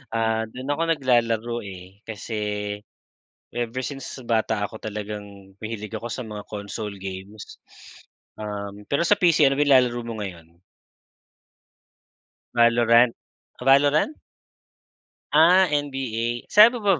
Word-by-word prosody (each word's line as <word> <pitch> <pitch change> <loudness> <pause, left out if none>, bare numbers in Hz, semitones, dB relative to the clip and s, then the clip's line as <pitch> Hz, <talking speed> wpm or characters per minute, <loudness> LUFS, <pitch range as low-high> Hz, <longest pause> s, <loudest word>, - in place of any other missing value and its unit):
ah, 110 0 +1
dun 130 +5 -5
ako 150 +3 -1
naglalaro 120 -5 +1
eh. 95 +1 -11
Kasi, 110 0 -5 1.1
ever 120 +1 -3
since 135 -1 -6
bata 110 -2 0
ako 110 +2 -5
talagang 100 -2 -7
mahilig 110 -1 -6
ako 115 +2 -6
sa 125 +4 -4
mga 105 -2 -7
console 105 0 -6
games. 95 +2 -8 0.8
Um, 105 -1 -6
pero 140 +4 +1
sa 205 +4 +3
PC 170 -4 +4
ano 135 - +2
ba - - +5
nilalaro 125 -3 +4
mo 115 -1 -5
ngayon? 85 -3 -9 2.0
Valorant, 115 0 +5 0.6
Valorant? 145 - +4 1.2
Ah, 175 +5 +7
NBA 125 -5 -2
sabi 220 +4 +8
mo 195 -6 +3
115 Hz, 115 wpm, -24 LUFS, 105-135 Hz, 2.0 s, sabi